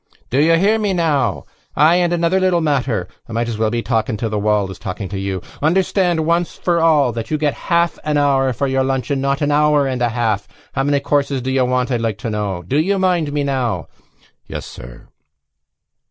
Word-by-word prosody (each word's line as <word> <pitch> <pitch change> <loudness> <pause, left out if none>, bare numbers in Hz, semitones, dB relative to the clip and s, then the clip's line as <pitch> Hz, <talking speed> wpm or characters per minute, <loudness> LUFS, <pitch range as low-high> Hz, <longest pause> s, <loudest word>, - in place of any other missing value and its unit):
"Do 135 +3 +3
you 165 +2 +4
hear 210 +5 +3
me 205 -3 0
now?... 145 - 0 0.3
Ay 160 +4 +5
and 175 -1 +1
another 170 +2 +2
little 185 -2 +2
matter! 135 - 0 0.2
I - - -7
might 115 +1 -1
as 115 -2 -4
well 110 -1 +2
be 120 +1 -2
talking 115 -1 -1
to 115 +1 -2
the 105 -1 -1
wall 105 -1 +1
as - - -10
talking 95 +2 -5
to 100 - -4
you. 95 -2 -3 0.2
Understand 175 0 +1
once 170 +1 0
for 175 -1 +1
all 150 -6 +4
that 115 -1 -5
you 155 - 0
get 150 -1 0
a - - -13
half 170 0 +2
an 150 -1 0
hour 135 -2 +2
for 135 +4 -2
your 135 0 +1
lunch 135 +1 -2
and 135 -1 0
not 140 +1 0
an 145 - +1
hour 150 -1 +3
and 130 -2 -2
a 120 - +2
half. 110 -4 -1 0.3
How 135 - 0
many 140 0 +1
courses 140 -3 0
do 130 - -2
you 130 -1 +2
want, 125 +1 0
I'd 120 -2 0
like 110 -4 -1
to 115 0 -4
know.... 100 -4 -3
Do 135 - 0
you 195 +5 +1
mind 180 -5 +1
me, 145 0 -1
now?" 120 - -2 0.6
"Yes, - - -6
sir." - - -11
135 Hz, 225 wpm, -18 LUFS, 115-160 Hz, 0.6 s, Ay